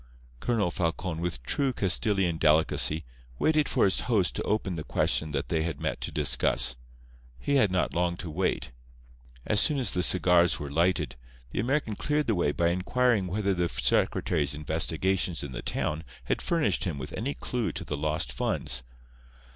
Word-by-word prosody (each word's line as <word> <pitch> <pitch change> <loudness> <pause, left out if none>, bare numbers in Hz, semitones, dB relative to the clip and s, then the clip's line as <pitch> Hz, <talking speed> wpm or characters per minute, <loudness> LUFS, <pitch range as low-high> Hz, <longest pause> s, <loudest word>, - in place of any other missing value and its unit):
Colonel 105 - 0
Falcon, 85 -1 -2
with 85 -9 -3
true 135 - 0
Castilian 95 -4 0
delicacy, 80 0 +3 0.3
waited 155 - +2
for - - +3
his 95 - +2
host 100 -7 +2
to - - -2
open 105 -3 -1
the 80 -3 -4
question 80 - +1
that 75 - -3
they 80 - +1
had 80 0 -3
met - - -3
to - - -3
discuss. 60 -1 +2 0.6
He 140 - +1
had 105 -7 +4
not 90 0 0
long 85 0 0
to 85 -2 -6
wait. 90 -5 -1 0.7
As 105 - +2
soon 150 +6 +3
as 130 - 0
the 90 - 0
cigars 90 -1 +4
were 70 -1 -6
lighted, 85 -1 +1 0.3
the - - -3
American 120 -1 0
cleared 150 +5 0
the 115 - +1
way 85 -6 +1
by 85 +3 +1
inquiring 105 +3 +1
whether 100 +2 0
the 90 -2 0
secretary's 75 -2 +1
investigations 80 +3 0
in 70 - -6
the - - -5
town 80 +2 -2 0.2
had - - -1
furnished 165 -9 +1
him 85 -6 -2
with 65 - -7
any 135 +6 -3
clue 120 -3 -2
to - - -4
the 75 - -3
lost 75 -1 -1
funds. - - -1
90 Hz, 175 wpm, -28 LUFS, 80-105 Hz, 0.7 s, had